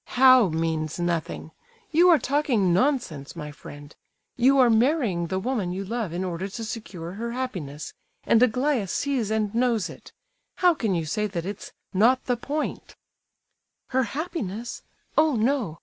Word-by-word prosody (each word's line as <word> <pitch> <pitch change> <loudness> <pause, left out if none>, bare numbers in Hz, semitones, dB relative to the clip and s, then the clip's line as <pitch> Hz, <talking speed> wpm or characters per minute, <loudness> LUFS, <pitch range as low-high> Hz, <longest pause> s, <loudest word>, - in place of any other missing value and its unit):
"How 255 -5 +7
'means 160 -1 -2
nothing'? 170 -2 -2 0.4
You 345 +3 +5
are 335 - +7
talking 265 -12 +1
nonsense, 190 - 0
my 150 -3 -6
friend. 145 0 -12 0.4
You 265 +3 +4
are 255 -2 +6
marrying 230 - +2
the 190 +2 -2
woman 210 -3 -1
you 195 +2 -4
love 225 -3 -3
in 175 +2 -3
order 180 +1 -3
to 210 +4 -7
secure 195 -7 -6
her 230 +5 -5
happiness, 175 - -5 0.3
and 230 - +3
Aglaya 250 -2 +2
sees 255 +1 -1
and 215 -1 0
knows 235 -3 +1
it. - - -14 0.4
How 360 -1 +4
can 220 - -1
you 165 -2 -1
say 210 +7 -1
that 175 -4 -4
it's 200 +1 -6 0.2
'not 240 +7 +3
the 250 - +1
point'?" 290 +6 -4 0.9
"Her 260 0 +2 0.2
happiness? 240 - -4 0.4
Oh, 310 -3 +3
no! 225 - 0
220 Hz, 155 wpm, -25 LUFS, 175-255 Hz, 0.9 s, How